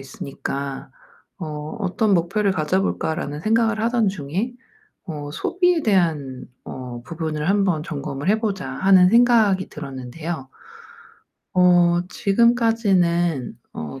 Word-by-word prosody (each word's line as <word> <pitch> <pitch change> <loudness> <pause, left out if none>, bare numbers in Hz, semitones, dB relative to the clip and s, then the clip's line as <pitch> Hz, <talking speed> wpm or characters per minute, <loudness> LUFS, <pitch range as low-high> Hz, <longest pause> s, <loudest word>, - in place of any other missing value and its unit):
있으니까 135 +1 -6 0.5
어 165 - -5 0.3
'어떤 205 +3 +1
목표를 195 +4 +1
가져 185 +3 0
볼까?'라는 150 -5 -2
생각을 225 +1 +1
하던 230 -2 +2
중에 190 - -3 0.5
어 145 -3 -6
'소비에 360 - +1
대한 155 - 0 0.2
어 125 -2 -7
부분을 155 +1 -4
한번 195 -6 +2
점검을 140 -1 -5
해 215 +2 +3
보자.' 200 -4 -2
하는 190 -2 +5
생각이 230 -6 +4
들었는데요. 140 +1 -6 1.1
어 175 -1 +4
지금까지는 195 - +2 0.2
어 80 - -7
175 Hz, 250 characters per minute, -22 LUFS, 150-210 Hz, 1.1 s, 하는